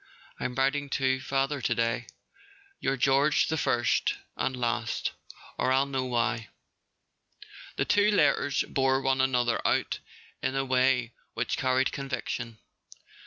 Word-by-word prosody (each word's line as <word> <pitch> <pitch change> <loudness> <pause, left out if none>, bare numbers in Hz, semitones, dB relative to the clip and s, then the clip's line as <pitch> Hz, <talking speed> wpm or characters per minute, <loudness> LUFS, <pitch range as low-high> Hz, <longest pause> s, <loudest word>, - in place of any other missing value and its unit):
I'm 125 -1 -3
writing 140 +2 +1
to 130 -1 +1
father 135 +1 -1
to - - 0
day. 115 +1 0 0.7
Your 135 0 0
George 140 +3 +3
the 160 - 0
First—and 125 0 0
Last 120 -1 -1 0.5
(or 130 - +2
I'll 135 +1 +3
know 135 -2 -2
why)." 120 -3 -1 1.3
The - - 0
two 205 +1 +4
letters 145 -8 +2
bore 135 0 +2
one 135 -1 +1
another 125 -3 +1
out - - +1 0.4
in 130 +1 -1
a 135 0 0
way 130 -2 +2 0.2
which - - -1
carried 130 0 +1
conviction. 125 -4 -4
130 Hz, 125 wpm, -28 LUFS, 120-135 Hz, 1.3 s, two